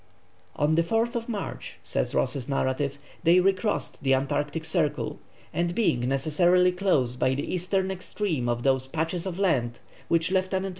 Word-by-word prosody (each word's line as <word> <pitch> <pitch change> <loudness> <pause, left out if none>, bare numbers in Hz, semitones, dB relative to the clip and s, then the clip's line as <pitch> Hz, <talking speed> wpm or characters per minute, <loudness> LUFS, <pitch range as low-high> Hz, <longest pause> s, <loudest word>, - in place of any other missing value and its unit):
"On 150 +2 +2
the 165 - +4
4th 230 +6 -1
March," 210 -4 -5
says - - -1
Ross's 130 0 0
narrative, 135 +1 0 0.2
"they 170 +2 +5
recrossed 195 +3 0
the 135 -1 +3
Antarctic 145 +4 -2
Circle, 160 -2 -1 0.3
and 175 0 -1
being 210 - +2
necessarily 175 +6 +3
close 180 -10 +1
by 130 +1 +1
the 140 - -3
eastern 190 +1 0
extreme 180 - -2
of 120 0 -1
those 130 -1 +2
patches 165 +5 -2
of 180 -2 -4
land 125 -12 +1 0.3
which 165 +1 +2
Lieut. 185 -1 +1
165 Hz, 150 wpm, -26 LUFS, 135-185 Hz, 0.3 s, they